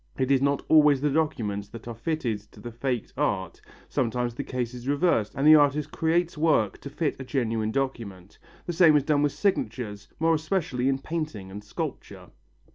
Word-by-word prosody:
It 130 0 0
is 135 -1 +4
not 140 0 +1
always 150 -3 +6
the 145 0 +1
documents 115 -10 -1
that 115 +3 -11
are 120 - -4
fitted 120 -2 -2
to - - -15
the 120 - -7
faked 120 0 -3
art, 100 - -2 0.3
sometimes 120 0 -1
the - - -5
case 125 -2 -3
is 125 0 -9
reversed 145 - +1
and 135 - -1
the 155 - +9
artist 145 -1 +3
creates 165 0 0
work 150 -11 +2
to 140 - -7
fit 150 +1 -2
a - - -5
genuine 115 -5 -1
document. 110 -8 -4 0.3
The 175 - -3
same 165 -2 +6
is 145 - +4
done 145 -1 +2
with 145 -1 +2
signatures, 110 - -2
more 165 +1 +3
especially 155 -5 0
in 135 - +1
painting 145 - -5
and 100 +2 -8
sculpture. 105 - -6
135 Hz, 190 wpm, -26 LUFS, 115-150 Hz, 0.3 s, the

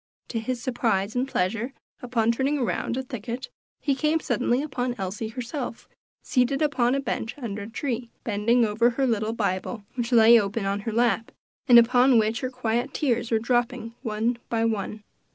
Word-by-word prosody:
To 230 - -2
his 245 +2 -3
surprise 225 -4 0
and 250 +2 0
pleasure, 225 +4 -1 0.3
upon 235 -2 +1
turning 270 +5 0
around 245 -1 -1
a 265 - -2
thicket, 245 0 -6 0.3
he 285 - +1
came 305 +4 +1
suddenly 255 -2 0
upon 250 -4 -2
Elsie 195 +3 -4
herself, 245 +2 -5 0.4
seated 255 +1 +1
upon 260 -4 +2
a - - +1
bench 245 -2 -3
under 215 -7 -5
a 200 - -7
tree, 240 -1 -3
bending 230 +2 +2
over 220 +3 +3
her 265 +3 0
little 220 -2 0
Bible, 205 0 -2
which 240 -1 -3
lay 230 0 +8
open 200 +1 -3
on 200 +1 0
her - - -2
lap, 230 0 +1 0.4
and 245 -2 +9
upon 245 +2 +6
which 220 +1 +2
her 255 - -2
quiet 250 +1 -2
tears 240 -5 0
were 225 - +3
dropping, 235 0 -1
one 230 0 -1
by 230 -1 +1
one. 215 -1 -2
235 Hz, 175 wpm, -25 LUFS, 220-255 Hz, 0.4 s, and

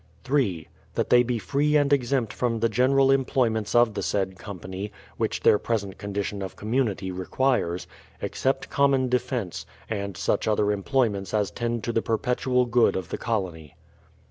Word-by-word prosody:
3. 125 - 0 0.3
That - - -1
they 120 - +7
be 125 0 -1
free 145 +8 +1
and 145 -1 +4
exempt 125 -4 +1
from 115 -2 -1
the 115 +1 +2
general 135 +4 +4
employments 120 -6 +1
of 120 -2 +5
the - - -3
said 95 -2 -1
company 95 +1 -6 0.3
(which - - -1
their 105 - +5
present 100 -5 -2
condition 100 0 -3
of 95 - -5
community 105 -4 -1
re 90 0 -6
quires), 120 -10 0 0.3
except 135 +1 -1
common 135 -2 +3
defence, 125 -6 -2 0.3
and 100 -3 -3
such 100 +2 0
other 105 -1 +2
employments 105 -2 0
as 105 -4 +1
tend 120 +2 -2
to 115 - -2
the 115 - +2
perpetual 125 +2 +1
good 120 0 +3
of 95 - -4
the - - -3
colony. 90 -10 -3
115 Hz, 165 wpm, -25 LUFS, 100-125 Hz, 0.3 s, they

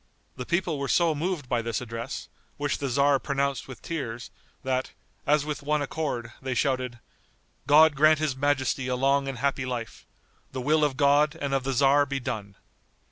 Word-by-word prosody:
The 125 -1 -6
people 170 -4 0
were 140 - -2
so 170 +1 +3
moved 155 -2 -3
by 120 -1 0
this 115 -1 -2
address, 115 -1 -6 0.3
which 145 -1 -1
the 140 - -2
tzar 140 +2 +3
pronounced 140 -1 -1
with 130 - -11
tears, 120 -8 -5 0.3
that, 130 0 -1 0.3
as 150 0 +3
with 150 -1 -4
one 150 +1 0
accord, 135 -6 -3
they 130 -1 -3
shouted, 130 -3 0 0.7
"God 155 +1 +7
grant 155 +2 +5
his 150 -3 -1
majesty 135 -1 0
a 125 - 0
long 135 +2 +2
and 135 -2 -4
happy 135 +1 0
life. 125 -3 -5 0.5
The 130 - -3
will 155 +4 +2
of 140 -3 +1
God 145 +2 +4
and 140 -1 -2
of 135 -1 +1
the 135 +1 -1
tzar 140 +2 +4
be 140 0 -2
done." 100 -5 -5
140 Hz, 185 wpm, -27 LUFS, 130-145 Hz, 0.7 s, God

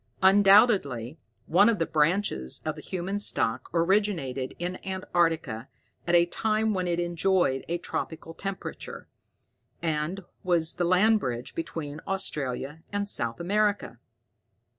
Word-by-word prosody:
Undoubtedly 190 - +5 0.3
one 200 +6 +5
of 230 - +1
the 165 - 0
branches 155 - 0
of - - -1
the - - -9
human 190 +2 -3
stock 125 - 0
originated 170 -7 0
in 180 +1 -4
antarctica 165 -10 -1 0.4
at 175 - +3
a 170 0 +6
time 215 +4 0
when 185 -2 -1
it 175 0 0
enjoyed 175 -5 +1
a 170 - -1
tropical 165 -1 -5
temperature, 195 +3 -6 0.7
and 160 +3 -2 0.2
was 170 -3 +2
the 175 - +1
land 210 +5 +4
bridge 125 - -4
between 160 -2 -5
Australia 150 -5 -2
and 205 0 -2
South 120 - -2
America." 205 +3 0
175 Hz, 125 wpm, -27 LUFS, 150-195 Hz, 0.7 s, a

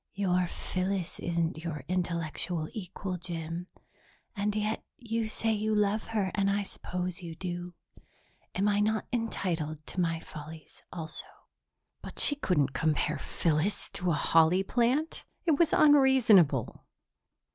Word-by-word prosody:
"Your 180 -2 +1
Phyllis 185 0 -3
isn't 170 -2 -1
your 155 -5 -4
intellectual 170 -2 0
equal, 185 -2 -5
Jim, 170 0 -5 0.7
and 205 0 -1
yet 215 +1 -1
you 230 -2 -2
say 225 +1 0
you 215 0 0
love 210 +1 +1
her 210 -4 0
and 200 -1 +2
I 200 +1 +1
suppose 180 -2 -4
you 165 -2 -7
do. 175 0 -5 0.8
Am 200 +2 +2
I 205 0 +3
not 215 +1 +1
entitled 165 -10 -2
to 185 - -2
my 165 -1 0
follies 155 0 -11
also?" 160 -2 -6 0.7
But - - -9
she 290 - +1
couldn't 150 - +1
compare 150 +3 +1
Phyllis 165 +5 0
to 180 0 -1
a 165 - +3
holly 165 +5 +4
plant! 255 +9 0 0.2
It 315 -5 +3
was 335 -2 +4
unreasonable. 250 - +5
180 Hz, 135 wpm, -30 LUFS, 165-215 Hz, 0.8 s, unreasonable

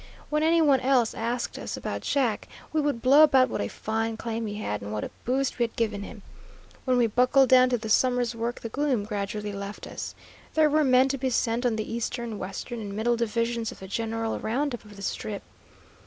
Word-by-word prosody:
When 300 0 +2
any 325 +1 +4
one 280 -3 +5
else 255 -3 +2
asked 235 +2 -3
us - - -5
about - - -4
Jack, 250 -7 0 0.3
we 310 - +2
would 285 -5 -1
blow 275 +4 +7
about 270 -4 +6
what - - -2
a 100 - -1
fine 225 - -2
claim 225 0 -3
he 205 - -5
had, 105 - -3
and 100 +1 -6
what 105 0 -3
a - - -5
boost 265 +1 0
we - - +4
had 230 - -9
given 220 -3 -1
him. 205 0 -9 0.6
When 255 -2 +2
we 240 - +4
buckled 250 +4 +4
down 255 -1 +7
to 245 - +1
the 220 -1 -6
summer's 245 +1 +2
work 230 +1 -3
the 230 - -5
gloom 260 -4 0
gradually 210 0 -3
left 200 +1 -6
us. - - -6 0.4
There 310 -1 +4
were 305 +1 +4
men 260 -1 +5
to 275 0 -2
be 260 0 0
sent 235 0 +1
on 230 - 0
the 220 +1 -4
eastern, 235 -1 -3
western, 195 +5 -5
and 200 -2 -6
middle 235 +3 +1
divisions 230 0 -1
of - - -11
the 190 - -9
general 225 +2 -2
round 270 +5 -1
up 240 - -6
of 210 -1 -13
the 200 - -10
Strip. 205 0 -4
235 Hz, 225 wpm, -27 LUFS, 215-255 Hz, 0.6 s, blow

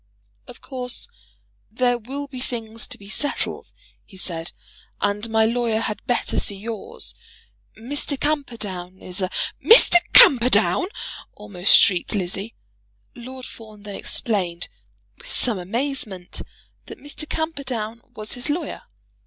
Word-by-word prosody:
"Of - - -11
course 250 -2 -2 0.6
there 245 +2 +1
will 270 +5 -5
be 265 -2 -9
things 230 -3 -5
to - - -5
be 200 - -14
settled," 285 +7 -1 0.3
he 190 - -16
said, 170 -2 -3 0.5
"and 205 +2 -1
my 220 0 +3
lawyer 230 -1 +1
had 215 -2 -3
better 245 - 0
see 200 - 0
yours. 220 +1 -4 0.6
Mr. 280 +4 -2
Camperdown 215 -12 -3
is 185 0 -4
a 185 - 0 0.2
" - - -37
"Mr. 455 -6 +9
Camperdown!" 250 - +7 0.5
almost 200 -2 +4
shrieked 185 +3 +3
Lizzie. 195 +3 -2 0.6
Lord 255 +1 -9
Fawn 215 -2 -12
then 205 -1 -7
explained, 180 -6 -1 0.5
with - - -13
some 235 - +1
amazement, 210 -2 -3 0.5
that - - -9
Mr. 290 +1 -7
Camperdown 260 -8 -3
was 215 0 -5
his 245 +3 -3
lawyer. 310 +4 -3
225 Hz, 130 wpm, -23 LUFS, 200-260 Hz, 0.6 s, Mr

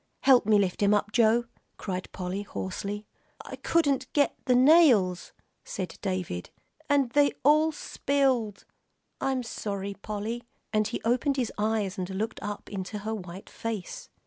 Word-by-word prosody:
"Help 255 -6 +6
me 215 -1 +5
lift 195 -2 0
him 205 +1 +4
up, 205 +1 -1
Joe," 230 +1 +4 0.3
cried 185 -2 -5
Polly, 185 +2 -4
hoarsely. 205 +1 -5 0.4
"I - - -7
couldn't 280 -6 +1
get 290 -1 +2
the 250 -2 +4
nails," 250 - +5 0.3
said 185 -2 -6
David, 185 - -3 0.4
"and 280 -4 +3
then 290 +2 +5
they - - -1
all 305 +3 +5
spilled. 265 -8 0 0.5
I'm 265 -2 0
sorry, 200 -3 -4
Polly," 215 +4 -5 0.3
and 215 -1 +2
he 225 - -4
opened 255 +4 +1
his 245 -4 -1
eyes 210 -2 -1
and 180 0 -3
looked 215 +4 -3
up 205 0 -5
into 200 +1 -5
her 220 - -1
white 190 -2 -8
face. 220 -5 -6
215 Hz, 150 wpm, -28 LUFS, 195-255 Hz, 0.5 s, Help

